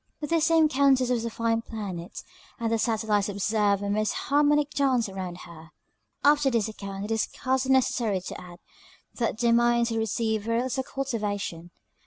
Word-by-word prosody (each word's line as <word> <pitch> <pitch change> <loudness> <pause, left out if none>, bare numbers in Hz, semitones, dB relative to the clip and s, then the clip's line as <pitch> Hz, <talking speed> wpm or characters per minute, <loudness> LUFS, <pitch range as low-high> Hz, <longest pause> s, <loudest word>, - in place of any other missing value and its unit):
This 315 +2 +1
same 325 -1 +4
Countess 270 -3 +3
was 235 -2 0
a - - -1
fine 230 0 0
planet, 195 -7 -7 0.4
and 230 -1 -1
the 225 - +1
satellites 215 -2 0
observed 205 0 +1
a 200 - -2
most 215 +1 0
harmonic 290 +1 +2
dance 260 -5 +1
around 185 -2 -6
her. 165 -1 -13 0.5
After 290 -1 +4
this 230 -4 +1
account 200 -2 -6
it 215 - -6
is 220 -1 +1
scarcely 260 +4 -1
necessary 240 -6 +2
to - - -7
add, 175 -1 -12 0.6
that 230 -2 0
their 235 0 +2
minds 235 0 +3
had 225 - -1
received 220 -1 -1
very 230 +1 0
little 260 +1 -2
cultivation. 205 -11 -4
230 Hz, 170 wpm, -26 LUFS, 205-260 Hz, 0.6 s, same